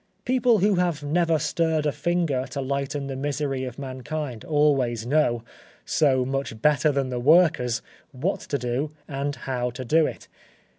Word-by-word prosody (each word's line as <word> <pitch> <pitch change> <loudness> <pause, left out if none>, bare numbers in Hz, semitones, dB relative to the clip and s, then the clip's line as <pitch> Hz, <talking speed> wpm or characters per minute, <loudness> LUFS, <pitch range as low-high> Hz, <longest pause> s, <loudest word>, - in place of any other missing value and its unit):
People 245 -2 +3
who 200 0 +2
have 175 -5 0
never 165 +2 +2
stirred 160 -1 0
a 150 - +2
finger 145 -3 0
to 140 - -5
lighten 140 +1 -2
the 135 -1 -4
misery 140 -1 -2
of 125 -1 -7
mankind 135 -1 -5
always 135 -7 +1
know, 120 -4 +2 0.4
so 130 -4 +2
much 135 -4 -3
better 150 +3 +3
than 135 -2 -1
the 125 - -2
workers, 145 -5 +4 0.3
what 145 +8 -2
to 140 - -3
do 125 +4 -2 0.2
and 145 0 -3
how 125 -2 -1
to 125 +2 -7
do 155 +5 +4
it. - - -8
140 Hz, 160 wpm, -25 LUFS, 130-155 Hz, 0.4 s, workers